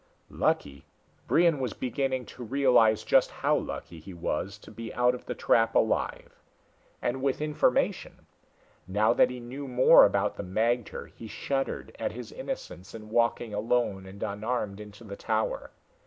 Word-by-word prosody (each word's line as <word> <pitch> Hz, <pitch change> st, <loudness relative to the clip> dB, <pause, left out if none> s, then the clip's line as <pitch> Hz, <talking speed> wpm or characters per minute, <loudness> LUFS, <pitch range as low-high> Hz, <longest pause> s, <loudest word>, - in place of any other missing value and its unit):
Lucky! 70 Hz, -1 st, -1 dB, 0.4 s
Brion 170 Hz, -3 st, +4 dB
was 125 Hz, -4 st, -2 dB
beginning 130 Hz, 0 st, -2 dB
to 125 Hz, -, -10 dB
realize 120 Hz, -3 st, +3 dB
just -, -, +4 dB
how -, -, 0 dB
lucky 85 Hz, 0 st, -5 dB
he 90 Hz, +4 st, -11 dB
was 90 Hz, +4 st, -3 dB
to -, -, -14 dB
be 115 Hz, +1 st, -7 dB
out 125 Hz, +1 st, +3 dB
of 125 Hz, -, -9 dB
the -, -, -3 dB
trap 115 Hz, -1 st, +2 dB
alive. 110 Hz, -, 0 dB, 0.6 s
And 125 Hz, +2 st, -1 dB
with 135 Hz, -1 st, 0 dB
information. 150 Hz, -4 st, 0 dB, 0.6 s
Now 105 Hz, +4 st, +3 dB
that -, -, +4 dB
he 125 Hz, 0 st, -6 dB
knew 130 Hz, +4 st, -7 dB
more 125 Hz, 0 st, +7 dB
about 100 Hz, 0 st, +2 dB
the -, -, -4 dB
magter, 115 Hz, +5 st, -1 dB
he 115 Hz, -, -10 dB
shuddered 135 Hz, +5 st, -3 dB
at -, -, -2 dB
his 120 Hz, -1 st, -8 dB
innocence 255 Hz, -, -7 dB
in 110 Hz, -1 st, -10 dB
walking 115 Hz, -1 st, +1 dB
alone 105 Hz, -3 st, 0 dB
and 100 Hz, +2 st, -8 dB
unarmed 105 Hz, 0 st, -3 dB
into 105 Hz, +1 st, -11 dB
the 100 Hz, -3 st, -8 dB
tower. 110 Hz, +1 st, -2 dB
115 Hz, 155 wpm, -28 LUFS, 105-125 Hz, 0.6 s, more